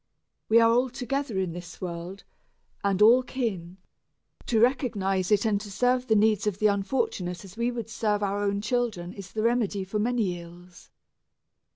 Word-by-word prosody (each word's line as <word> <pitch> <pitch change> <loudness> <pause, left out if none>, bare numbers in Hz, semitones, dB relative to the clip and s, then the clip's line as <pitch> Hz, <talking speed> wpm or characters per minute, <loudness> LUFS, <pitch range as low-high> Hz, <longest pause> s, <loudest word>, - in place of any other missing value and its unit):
We 225 +1 +6
are 230 0 +5
all 250 +2 +2
together 255 -2 -3
in 190 -2 -1
this 175 -1 -9
world, 180 +2 -6 0.6
and 200 0 +2
all 240 +4 +7
kin; 200 -9 -4 0.7
to 225 - +2
recognize 215 -7 +1
it 210 +1 +3
and 205 -2 +1
to 210 - -8
serve 250 +5 +1
the 220 - +3
needs 215 0 +3
of 200 -3 -1
the 215 - -1
unfortunate 200 - -1
as 190 0 -13
we 235 +1 0
would 235 -2 -5
serve 210 -2 -1
our 200 0 -1
own 200 0 0
children 210 -6 -2
is 195 -2 -10
the 215 - -2
remedy 225 -4 +1
for 195 +3 -3
many 215 -6 0
ills. 175 +1 -14
210 Hz, 175 wpm, -27 LUFS, 190-235 Hz, 0.7 s, all